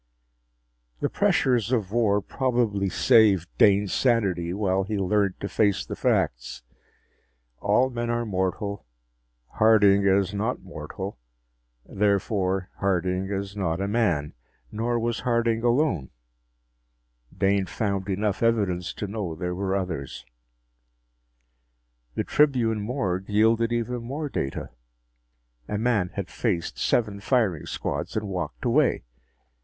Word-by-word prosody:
The -, -, -1 dB
pressures 120 Hz, -3 st, +2 dB
of 110 Hz, -7 st, 0 dB
war 105 Hz, -3 st, +2 dB
probably 115 Hz, -6 st, 0 dB
saved 95 Hz, -3 st, +4 dB
Dane's 100 Hz, -2 st, +4 dB
sanity 95 Hz, -9 st, +1 dB
while 95 Hz, 0 st, 0 dB
he 105 Hz, +2 st, -3 dB
learned 100 Hz, 0 st, +1 dB
to -, -, -2 dB
face 100 Hz, -2 st, +1 dB
the -, -, -5 dB
facts. -, -, -1 dB, 1.0 s
All 120 Hz, +6 st, +2 dB
men 120 Hz, -1 st, -3 dB
are 120 Hz, 0 st, 0 dB
mortal; 95 Hz, -, -2 dB, 0.6 s
Harding 105 Hz, -3 st, +4 dB
is 95 Hz, 0 st, +2 dB
not 110 Hz, +4 st, -2 dB
mortal; 95 Hz, +1 st, -7 dB, 0.7 s
therefore, 95 Hz, -2 st, 0 dB
Harding 95 Hz, 0 st, 0 dB
is 100 Hz, 0 st, -4 dB
not 85 Hz, -4 st, -1 dB
a 100 Hz, -, -1 dB
man! 95 Hz, -10 st, 0 dB, 0.4 s
Nor 120 Hz, +2 st, -1 dB
was 115 Hz, 0 st, -1 dB
Harding 115 Hz, -2 st, +1 dB
alone 120 Hz, -, +1 dB, 1.3 s
Dane 100 Hz, -1 st, +2 dB
found 100 Hz, 0 st, -2 dB
enough 100 Hz, +1 st, -1 dB
evidence 100 Hz, -6 st, +1 dB
to -, -, -5 dB
know 100 Hz, -5 st, -4 dB
there 90 Hz, +2 st, -3 dB
were 95 Hz, +1 st, -1 dB
others. 85 Hz, -8 st, -4 dB, 1.9 s
The -, -, 0 dB
Tribune 120 Hz, -7 st, +2 dB
morgue 100 Hz, -5 st, -2 dB
yielded 115 Hz, +2 st, +3 dB
even 120 Hz, +1 st, -2 dB
more 140 Hz, +6 st, -4 dB
data. 70 Hz, -, -4 dB, 1.0 s
A 105 Hz, -, -2 dB
man 110 Hz, -5 st, +1 dB
had 100 Hz, -3 st, -3 dB
faced 90 Hz, -3 st, -2 dB
seven 105 Hz, -4 st, +1 dB
firing 105 Hz, -, 0 dB
squads -, -, -3 dB
and 105 Hz, -1 st, -2 dB
walked 95 Hz, +5 st, -5 dB
away. 130 Hz, +3 st, +2 dB
100 Hz, 120 wpm, -25 LUFS, 95-115 Hz, 1.9 s, saved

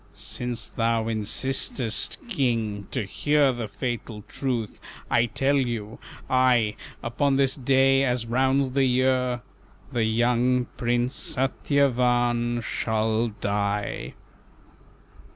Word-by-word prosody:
"Since 120 Hz, -2 st, -5 dB
thou 115 Hz, 0 st, +1 dB
insistest, 115 Hz, +1 st, -1 dB
King, 115 Hz, -, -1 dB
to 130 Hz, -, -2 dB
hear 145 Hz, +6 st, +2 dB
The 120 Hz, -2 st, -4 dB
fatal 115 Hz, -2 st, -5 dB
truth, 120 Hz, -6 st, -3 dB, 0.3 s
I 120 Hz, 0 st, +4 dB
tell 135 Hz, +5 st, +1 dB
you, 115 Hz, -5 st, -2 dB, 0.3 s
I, 125 Hz, -4 st, +3 dB, 0.3 s
Upon 135 Hz, +4 st, +1 dB
this 135 Hz, -1 st, +2 dB
day 135 Hz, +1 st, +3 dB
as 125 Hz, -3 st, 0 dB
rounds 130 Hz, +3 st, +2 dB
the 135 Hz, +1 st, +2 dB
year 125 Hz, -1 st, +1 dB, 0.5 s
The 115 Hz, -2 st, +1 dB
young 120 Hz, +2 st, +2 dB
Prince 120 Hz, +2 st, 0 dB
Satyavan 125 Hz, -3 st, +1 dB
shall 110 Hz, 0 st, 0 dB
die." 100 Hz, -1 st, -2 dB
120 Hz, 100 wpm, -25 LUFS, 115-130 Hz, 0.5 s, I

